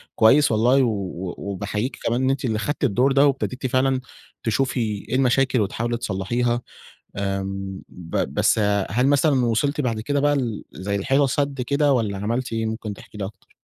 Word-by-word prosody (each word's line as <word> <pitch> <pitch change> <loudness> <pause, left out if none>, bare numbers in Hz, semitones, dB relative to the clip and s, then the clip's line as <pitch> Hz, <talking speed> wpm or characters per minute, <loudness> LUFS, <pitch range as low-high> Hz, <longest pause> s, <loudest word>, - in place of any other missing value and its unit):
كويّس 135 +6 +5
والله، 125 +5 +4
و 95 -5 -3
وباحييك 100 +5 -3
كمان 125 +3 +1
أنتِ 135 -1 -1
اللي 110 -2 0
خدتِ 145 +4 -3
الدور 130 +3 +3
ده، 140 +1 +5
وابتديتِ 130 -1 -1
فعلًا 130 +1 +1 0.4
تشوفي 125 +3 0 0.3
إيه - - 0
المشاكل 130 -2 +3
وتحاولي 120 +4 -1
تصلحيها. 120 +4 -1 0.6
آمم، 95 -1 -3
ب 85 -2 -7 0.2
بس - - +3 0.3
هل 125 +6 +2
مثلًا 140 -2 +3
وصلتِ 140 +6 +1
بعد 115 -5 -1
كده 145 +5 0
بقى 145 0 +3
ل 120 -6 -2
زي 95 +7 -3
لحيطة 135 +7 +2
سد 140 +1 -1
كده، 140 +2 +2
والّا 105 -6 0
عملتِ 115 +5 -2
إيه؟ 115 0 -1
ممكن 110 -1 -4
تحكي 105 - -13
لي 100 - -2
أكتر. 100 - -11
120 Hz, 165 wpm, -23 LUFS, 105-135 Hz, 0.6 s, كويّس